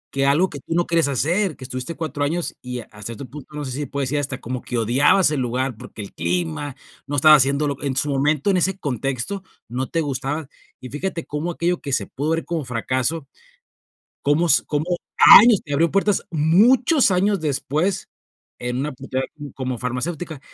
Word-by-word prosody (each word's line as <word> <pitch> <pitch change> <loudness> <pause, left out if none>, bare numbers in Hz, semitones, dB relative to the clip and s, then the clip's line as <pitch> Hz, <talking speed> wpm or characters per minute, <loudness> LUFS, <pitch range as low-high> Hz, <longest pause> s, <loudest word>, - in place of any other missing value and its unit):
que 135 0 +2
algo 155 +7 +3
que 145 - -8
tú - - -5
no 175 0 +2
quieres 165 -4 +2
hacer, 165 - 0
que 130 - -9
estuviste 130 +5 -5
4 145 -2 -3
años 170 +4 -2
y 125 -1 -5
hasta 105 -3 -12
cierto 115 +6 -6
otro 125 - -17
punto, 150 0 -11
no 145 - -4
sé 130 - -5
si 135 - -4
se 145 - -4
puede 140 +1 -3
decir 140 +3 -1
hasta 135 -2 -4
como 125 +1 -5
que 120 - -4
odiabas 135 - +4
el 145 - -1
lugar 125 +1 -1
porque 110 - -10
el 100 - -9
clima, 90 - -2 0.3
no 145 +1 -3
estaba 155 +3 +8
haciéndolo 140 +1 +2
en 135 -2 -2
su 145 - +2
momento 145 +6 +1
en 195 - +3
ese 190 +2 +1
contexto 135 - -3 0.2
no 125 +3 -3
te 165 - -1
gustaba, 145 0 -2 0.3
y 130 - -9
fíjate 165 +4 -4
cómo 150 +4 -3
aquello 175 +1 -1
que 140 - -5
se 130 - 0
pudo 145 +4 -3
ver 165 0 -1
como 170 -3 -2
fracaso, 130 +5 -2 0.9
como 145 +4 +2
s 145 - +4
como 150 +1 -1 0.6
años 225 -3 +5
te 145 - -4
abrió 165 +4 +3
puertas 195 0 +1
muchos 220 - +4
años 195 +2 +2
después 155 +5 -1 0.5
en 125 0 -3
una 145 +3 -2
pues 135 +2 -12
ya 130 0 0 0.3
como 130 -2 -4
farmacéutica, 150 +5 -4
145 Hz, 200 wpm, -22 LUFS, 130-165 Hz, 0.9 s, estaba